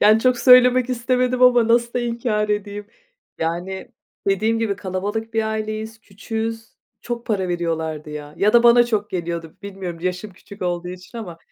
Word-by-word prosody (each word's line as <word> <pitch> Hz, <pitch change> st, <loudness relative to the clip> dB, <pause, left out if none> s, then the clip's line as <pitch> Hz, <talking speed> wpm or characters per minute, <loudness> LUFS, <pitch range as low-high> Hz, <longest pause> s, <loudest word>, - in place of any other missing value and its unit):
Yani, 215 Hz, +1 st, +6 dB
çok 255 Hz, 0 st, +2 dB
söylemek 250 Hz, 0 st, +6 dB
istemedim 250 Hz, +1 st, 0 dB
ama 245 Hz, -2 st, +6 dB
nasıl 235 Hz, 0 st, +3 dB
da 245 Hz, -, 0 dB
inkar 230 Hz, -3 st, -1 dB
edeyim. 205 Hz, 0 st, -3 dB, 0.5 s
Yani, 175 Hz, +4 st, -3 dB, 0.4 s
dediğim 215 Hz, +4 st, +1 dB
gibi 215 Hz, -4 st, -1 dB
kalabalık 205 Hz, +4 st, -4 dB
bir 225 Hz, -, +2 dB
aileyiz, 220 Hz, 0 st, -4 dB
küçüğüz, 225 Hz, +2 st, -5 dB, 0.3 s
çok 240 Hz, 0 st, -5 dB
para 195 Hz, -5 st, -1 dB
veriyorlardı, 160 Hz, -3 st, -3 dB
ya. 150 Hz, 0 st, -8 dB
Ya 210 Hz, +2 st, +3 dB
da 235 Hz, -, +6 dB
bana 240 Hz, 0 st, +6 dB
çok 215 Hz, -3 st, -1 dB
geliyordu, 170 Hz, -2 st, -4 dB
bilmiyorum, 190 Hz, -4 st, -6 dB
yaşım 185 Hz, +3 st, -3 dB
küçük 200 Hz, +2 st, -12 dB
olduğu 175 Hz, 0 st, -2 dB
için 180 Hz, +6 st, -9 dB
ama 175 Hz, -7 st, -8 dB
210 Hz, 160 wpm, -21 LUFS, 180-235 Hz, 0.5 s, Yani